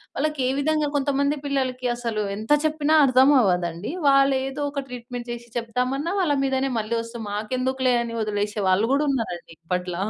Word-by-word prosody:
వాళ్ళకేవిధంగా 295 +1 0
కొంతమంది 280 +1 +1
పిల్లలకి 255 -3 -1
అసలు 230 -3 -2
ఎంత 220 +6 -6
చెప్పినా 310 0 +2
అర్థమవ్వదండి. 220 - +3
వాళ్ళేదో 275 0 +2
ఒక 280 -1 -3
ట్రీట్‌మెంట్ 245 0 -7
చేసి 240 0 -10
చెప్దామన్నా, 250 +8 -2
వాళ్ళ 300 -6 +2
మీదనే 265 0 0
మళ్ళీ 215 +2 -2
ఒస్తే, 230 0 -8
మాకెందుకులే 255 +4 0
అని 230 -1 -6
ఒదిలేసే 210 0 -2
వాళ్ళు 195 +4 +3
గూడున్నారండి 260 - -1
ఇప్పట్ల. 180 +1 -3
255 Hz, 130 wpm, -24 LUFS, 225-275 Hz, -, అర్థమవ్వదండి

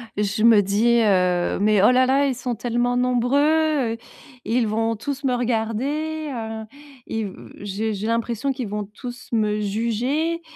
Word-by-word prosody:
Je 210 +1 -1
me 225 -3 +7
dis, 225 +5 +2
heu, 180 -4 +2
mais: 210 -1 +3
«Oh 245 - +7
là 255 0 +4
là, 275 +2 +3
ils 260 - -1
sont 245 -1 -3
tellement 240 +2 0
nombreux, 275 +2 +2
heu, - - -6 0.5
ils 235 -1 +1
vont 225 +1 0
tous 280 +5 -5
me 255 -2 +1
regarder, 255 +7 -2
heu, 220 -1 -5 0.4
ils 220 -1 -2
v» - - -9 0.3
j'ai 215 +3 -2
j'ai 205 +2 -4
l'impression 230 +3 -1
qu'ils 250 -4 -4
vont 210 0 -3
tous 245 +4 -9
me 215 -2 +1
juger. 240 +11 -1
235 Hz, 165 wpm, -22 LUFS, 215-255 Hz, 0.5 s, me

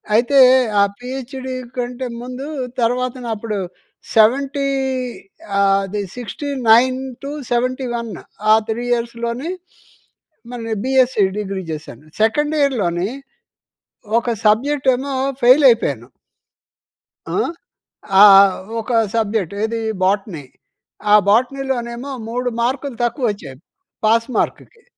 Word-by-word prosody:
అయితే 250 +5 +4 0.4
ఆ - - +6 0.2
పిహెచ్‌డి 260 +1 -6 0.2
కంటే 245 +1 -3 0.2
ముందు 255 +2 -7 0.4
తర్వాతన 250 +1 -1
అప్పుడు 215 0 -4 0.6
70 275 +5 +3 0.9
ఆది 195 +1 +1 0.2
69-71 255 0 0 0.4
ఆ - - +9 0.2
3 225 +2 -2
ఇయర్స్‌లోనే 235 +4 -2 1.0
మరి 230 -2 -4
బిఎస్‌సి 260 -5 +3 0.2
డిగ్రీ 195 -2 -4
జేశాను. 150 0 -8 0.2
సెకండ్ 295 +8 +1
ఇయర్‍లోని 195 -9 0 1.1
ఒక 235 - -4 0.2
సబ్జెక్ట్ 265 +6 +2
ఏమో 275 +2 -4 0.3
ఫెయిల్ 255 +4 +6
అయిపోయేను. 230 -1 0 1.2
ఆ? - - -2 0.8
ఆ! - - +11 0.6
ఒక 225 - -5 0.2
సబ్జెక్ట్ 215 -5 -1
ఏదీ, 225 +1 -2 0.2
బోటనీ. 190 -5 -1 0.7
ఆ - - +10
బోటనీలోనేమో 250 +1 -1 0.2
3 245 +2 -2
మార్కులు 260 +1 -2
తక్కువొచ్చాయి, 215 - -2 0.5
పాస్‌మార్క్‌కి. 230 - -1
240 Hz, 85 wpm, -19 LUFS, 220-265 Hz, 1.2 s, ఆ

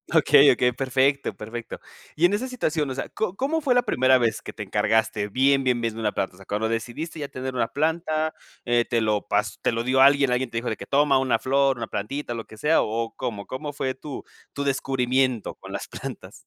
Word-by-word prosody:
Okey, 145 -2 +7
okey, 125 0 +2
perfecto, 135 +2 +1
perfecto. 115 +2 -7 0.3
Y 160 - -3
en 175 - +3
esa 230 +6 -1
situación, 155 - -1
o 130 - -4
sea, - - -4
co 195 -3 -3
¿cómo 290 +7 0
fue 275 -5 +1
la 245 - +5
primera 130 - +3
vez 115 -3 0
que - - -8
te - - -6
encargaste 110 -2 +1
bien, 135 +5 +2
bien, 125 -2 +1
bien 115 -1 -2
de - - -7
una 105 -2 -1
planta? 95 -1 -2
O - - -19
sea 95 - -14
¿Cuándo 110 +2 -1
decidiste 125 +8 -4
ya 145 - -3
tener 130 -1 -5
una 115 -2 +1
planta?, 155 +1 0 0.3
eh, 120 -1 +2
¿te 115 -1 +1
lo 105 -1 0
pas 105 0 -1
te - - +1
lo 115 - -1
dio 130 +2 +1
alguien? 140 -1 +6
¿Alguien 125 0 0
te 115 - -5
dijo 120 - -3
de 110 - -3
que - - -8
toma 140 -1 +3
una 130 -2 +1
flor, 135 0 +2
una 115 -2 -5
plantita, 130 +5 -4
lo 115 -1 -6
que - - -13
sea 150 +9 +3
o 115 +1 -3
cómo? 110 -6 -4
¿Cómo 145 +2 -5
fue 130 -2 -2
tu 140 0 -8 0.3
tu 140 - -3
descubrimiento 130 -3 0
con - - -11
las - - -5
plantas? - - -8
130 Hz, 235 wpm, -24 LUFS, 115-145 Hz, 0.3 s, Okey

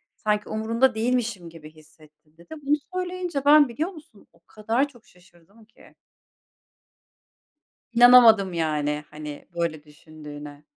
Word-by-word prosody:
sanki 210 -1 -2
umurunda 225 +3 0
değilmişim 225 -6 -2
gibi 155 -2 -14
hissettim.” 155 0 -23
dedi. 175 - -12
Bunu 285 +1 +1 0.2
söyleyince 360 -5 -4
ben, 290 -2 +6
biliyor 310 +10 -3
musun, 310 - -17
o - - -27
kadar 225 +6 -1
çok 240 -5 -21
şaşırdım 180 +4 -23
ki. 225 - -22 2.0
İnanamadım 235 -5 +6
yani. 150 -2 -2
Hani, 150 -1 -10
böyle 165 -3 -3
düşündüğüne. 150 -1 -12
210 Hz, 115 wpm, -24 LUFS, 155-250 Hz, 2.0 s, ben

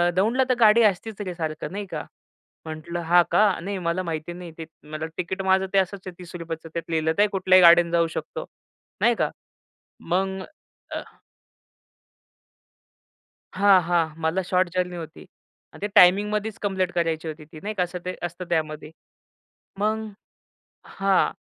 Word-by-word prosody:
"दौंडला 230 +8 +3
तर 255 - +3
गाडी 225 +1 +6
असतीच 210 +1 0
रे 185 -3 -4
सारखं" 160 0 -4
नाही 205 +1 -4
का. - - -4 0.6
म्हटलं 160 +2 -5
"हां 175 +1 +6
का? 215 - +5 0.2
नाही 195 +2 -4
मला 175 +1 -1
माहिती 165 0 -4
नाही 175 -1 -9
ते, 160 - -6 0.2
मला 155 +1 -5
ते 160 - -17
तिकीट 185 +2 -3
माझं 190 0 +3
ते - - +3
असंच 190 0 -3
आहे 185 - -6
₹30रुपयाचं 165 -2 -7
त्यात 170 -1 -5
लिहिलं, 160 0 +1
तर 210 - +6
कुठल्याही 185 -1 +5
गाडीन 170 0 +7
जाऊ 170 -1 +3
शकतो." - - -5 0.6
नाही - - +4
का. - - +2 0.8
मग 190 +1 0 0.5
अ - - -3 2.5
हां, 195 -1 +5
हां. 165 -2 +1
मला 160 +4 +1
शॉर्ट 180 0 +1
जर्नी 180 -1 -1
होती 160 -2 -9 0.5
आणि - - -14
ते 205 - 0
टाईमिंगमध्येच 210 +3 +4
कंप्लीट 190 -3 -1
करायची 165 -2 -1
होती 155 -1 -7
ती 155 0 -12
नाही 215 +1 -3
का? 180 - +2
असं 180 +1 -5
असते 175 +2 -6
त्यामध्ये. 155 -2 -2 0.9
मग 220 +2 0 0.8
हां, 195 -1 +1
180 Hz, 155 wpm, -24 LUFS, 165-195 Hz, 2.5 s, गाडीन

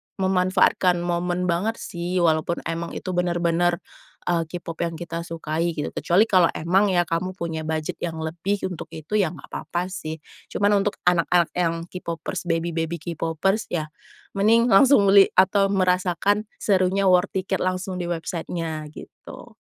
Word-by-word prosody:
memanfaatkan 185 -1 +2
momen 175 +1 -1
banget, 180 +6 0
sih. 175 -1 -3
Walaupun 160 +1 +1
emang 165 +1 -4
itu 185 - -4
bener-bener, 175 -1 +1 0.4
eee, 165 -2 0
K-Pop 165 -1 -7
yang 170 -1 -2
kita 170 0 -6
sukai, 165 0 -2
gitu. 150 - -3
Kecuali 180 +5 +3
kalau 185 -6 +4
emang 190 +6 +2 0.2
kamu 175 +3 -3
punya 160 -3 -4
budget 160 +2 -3
yang 165 -2 -3
lebih 175 +5 -3
untuk 170 - -7
itu, 160 +7 -2
ya 190 - +3
nggak - - -14
papa, 180 +2 -4
sih. 160 -4 -6 0.2
Cuman 205 0 +2
untuk 205 - -1
anak-anak 175 -1 +3
yang 165 -1 0
K-Popers, 175 0 -5
baby-baby 165 0 -1
K-popers, 170 +5 -2
ya 155 -3 -3 0.4
mending 225 +4 +3
langsung 250 +3 +6
beli 195 0 +7
atau 195 +2 +4
merasakan 190 +2 +1 0.2
serunya 190 -1 +3
war 180 0 +4
tiket 190 0 -2
langsung 185 0 -2
di 175 - -3
website-nya, 165 -2 -4
gitu. - - -12
175 Hz, 145 wpm, -23 LUFS, 165-190 Hz, 0.4 s, beli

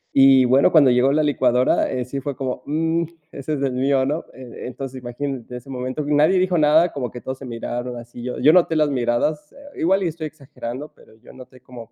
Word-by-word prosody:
Y 135 -1 +6
bueno, 135 +8 +4
cuando 145 -6 +6
llegó 125 +2 +3
la 155 +2 +2
licuadora, 125 -4 +2
eh, 125 -2 -2
sí 135 +2 -5
fue 140 0 -5
como: 130 -2 -4
"Mm, 165 +2 0 0.3
ese 140 +3 -5
es 140 - -3
el 135 -2 0
mío, 130 +1 +1
¿no?". 150 +4 -2
Entonces 130 +1 -8
imagínate 125 0 -5
ese 125 +2 -13
momento, 130 +3 -4
nadie 150 +5 +3
dijo 180 -1 +1
nada, 155 +3 +4
como 125 -5 -4
que 125 - -9
todos 130 0 -5
se 135 - -9
miraron 120 +1 -5
así. 120 0 -10
Yo 125 0 -5
yo 150 +5 +5
noté 170 -2 +4
las 155 -1 +2
miradas, 140 +4 -1
eh, 285 0 -14
igual 190 +4 +2
y - - 0
estoy 160 -1 -4
exagerando, 140 -2 -8
pero - - -20
yo - - -15
noté 130 0 -14
como 120 -3 -12
135 Hz, 215 wpm, -21 LUFS, 125-150 Hz, 0.3 s, Y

